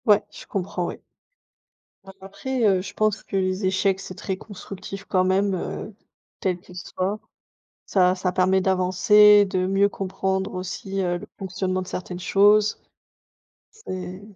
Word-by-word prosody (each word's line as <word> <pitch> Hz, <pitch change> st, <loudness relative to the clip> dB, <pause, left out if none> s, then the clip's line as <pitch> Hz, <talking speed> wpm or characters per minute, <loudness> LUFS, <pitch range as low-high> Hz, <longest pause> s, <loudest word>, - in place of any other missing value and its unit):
Ouais. 210 Hz, -2 st, +5 dB
Je -, -, -11 dB
comprends, 180 Hz, -2 st, -3 dB
oui. -, -, -7 dB, 1.0 s
A 195 Hz, -, -11 dB
après, 240 Hz, +6 st, -4 dB
heu, 190 Hz, -3 st, +3 dB
je 190 Hz, -, -8 dB
pense 215 Hz, -1 st, +1 dB
que -, -, -7 dB
les 185 Hz, +1 st, 0 dB
échecs, 190 Hz, 0 st, +1 dB
c'est 185 Hz, -1 st, -8 dB
très 190 Hz, -, -3 dB
constructif 195 Hz, 0 st, -9 dB
quand 185 Hz, -2 st, +2 dB
même, 190 Hz, +2 st, +2 dB
heu, 195 Hz, +3 st, -5 dB, 0.4 s
quel 185 Hz, -2 st, -1 dB
qu'ils 180 Hz, 0 st, -16 dB
soient. 185 Hz, +3 st, -3 dB, 0.7 s
Ça 185 Hz, -2 st, +4 dB
ça 185 Hz, -1 st, -1 dB
permet 185 Hz, +1 st, +2 dB
d'avancer, 200 Hz, +3 st, +5 dB
de 185 Hz, -1 st, -1 dB
mieux 195 Hz, +2 st, +3 dB
comprendre 190 Hz, 0 st, -2 dB
aussi, 190 Hz, +1 st, -4 dB
heu, 175 Hz, -1 st, 0 dB
le -, -, -10 dB
fonctionnement 185 Hz, 0 st, -2 dB
de 185 Hz, -, -8 dB
certaines 180 Hz, -1 st, -5 dB
choses. 205 Hz, +3 st, +4 dB, 0.9 s
C'est 185 Hz, -, -7 dB
190 Hz, 150 wpm, -24 LUFS, 185-200 Hz, 1.0 s, Ouais